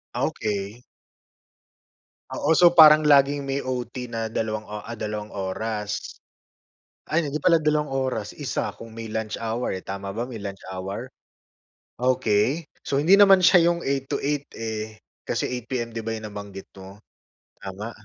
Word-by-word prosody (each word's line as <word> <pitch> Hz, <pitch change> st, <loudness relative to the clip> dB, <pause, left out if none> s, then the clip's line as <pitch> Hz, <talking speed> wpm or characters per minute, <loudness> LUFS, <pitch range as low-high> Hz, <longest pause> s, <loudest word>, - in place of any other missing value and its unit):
Okey. 105 Hz, +2 st, -2 dB, 1.5 s
Oo, 160 Hz, +3 st, +1 dB
so 175 Hz, +2 st, +7 dB
parang 155 Hz, -3 st, +8 dB
laging 140 Hz, 0 st, +5 dB
may 135 Hz, 0 st, -2 dB
OT 125 Hz, -1 st, -4 dB
na 115 Hz, -2 st, -4 dB
dalawang 110 Hz, -1 st, -2 dB
o 105 Hz, 0 st, -7 dB
ah, 115 Hz, -, -6 dB
dalawang 105 Hz, -1 st, -5 dB
oras. 105 Hz, +2 st, -3 dB, 1.1 s
Ay 160 Hz, +1 st, +1 dB
hindi 150 Hz, +1 st, -3 dB
pala 175 Hz, -2 st, +5 dB
dalawang 150 Hz, -1 st, 0 dB
oras, 130 Hz, -6 st, -3 dB
isa -, -, -2 dB
kung 115 Hz, -1 st, -11 dB
may 115 Hz, 0 st, -7 dB
lunch 110 Hz, 0 st, -3 dB
hour, 115 Hz, +2 st, -2 dB
tama 95 Hz, 0 st, -6 dB
ba 120 Hz, +3 st, -4 dB
may 120 Hz, -, -6 dB
lunch 100 Hz, -2 st, -7 dB
hour? 95 Hz, +1 st, -5 dB, 0.9 s
Okey. 130 Hz, +3 st, +1 dB, 0.2 s
So, -, -, 0 dB
hindi 195 Hz, +5 st, +6 dB
naman 195 Hz, -2 st, +7 dB
siya 175 Hz, -1 st, +6 dB
yung 170 Hz, 0 st, 0 dB
8:00-8:00 140 Hz, +1 st, -2 dB
eh, 110 Hz, -1 st, -5 dB, 0.3 s
kasi -, -, -1 dB
8 125 Hz, -2 st, -5 dB
PM 120 Hz, -3 st, -3 dB
di 115 Hz, -, -5 dB
ba, 115 Hz, 0 st, -3 dB
yung 110 Hz, -, -8 dB
nabanggit 100 Hz, -1 st, -9 dB
mo, 95 Hz, +2 st, -12 dB, 0.6 s
tama? 100 Hz, +3 st, -7 dB
115 Hz, 150 wpm, -24 LUFS, 105-140 Hz, 1.5 s, parang